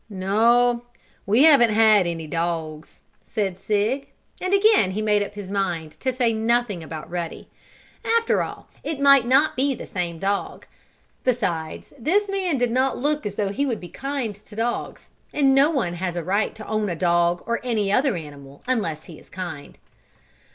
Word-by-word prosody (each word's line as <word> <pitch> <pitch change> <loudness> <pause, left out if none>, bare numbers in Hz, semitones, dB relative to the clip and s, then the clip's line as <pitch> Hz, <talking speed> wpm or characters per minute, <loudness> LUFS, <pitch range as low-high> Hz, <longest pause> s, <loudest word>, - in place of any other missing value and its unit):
"No, 235 +5 +2 0.4
we 225 +7 +4
haven't 240 -9 +6
any 190 -7 +4
dogs," 160 -1 -4 0.2
said 195 -5 -3
Sig. 210 +7 -1 0.3
And 370 - -2
again 400 - +4
he 215 - -2
made 210 -1 +2
up 205 0 -4
his 200 -2 -7
mind 175 -6 -2
to 260 - 0
say 245 -2 +1
nothing 225 -3 0
about 155 -1 -7
Ruddy. 170 -1 -5 0.5
After 460 0 +2
all - - -6 0.2
it 310 -3 -4
might 275 -3 +6
not 275 +5 +4
be 270 +1 +1
the - - -8
same 175 -3 -3
dog. 200 +3 -2 0.6
Besides, 175 -11 -2
this 395 - +1
man 370 -6 0
did 245 -1 0
not 260 +2 +1
look 295 -3 0
as 200 - -6
though 205 -2 -1
he 275 +8 -1
would 235 -5 -2
be 175 - -10
kind 270 -5 -4
to 210 +1 -16
dogs, 235 +2 -3 0.2
and 275 -2 +3
no 275 +3 +5
one 255 - -1
has 175 0 -3
a 170 - -2
right 200 +6 0
to 220 -1 -9
own 215 -2 -1
a 175 - -2
dog, 175 +1 +1
or 235 0 -1
any 215 -5 0
other 260 +2 +2
animal, 140 -4 -10
unless 205 -12 -1
he 160 - -12
is - - -20
kind. 175 -6 -7
215 Hz, 175 wpm, -23 LUFS, 175-260 Hz, 0.6 s, haven't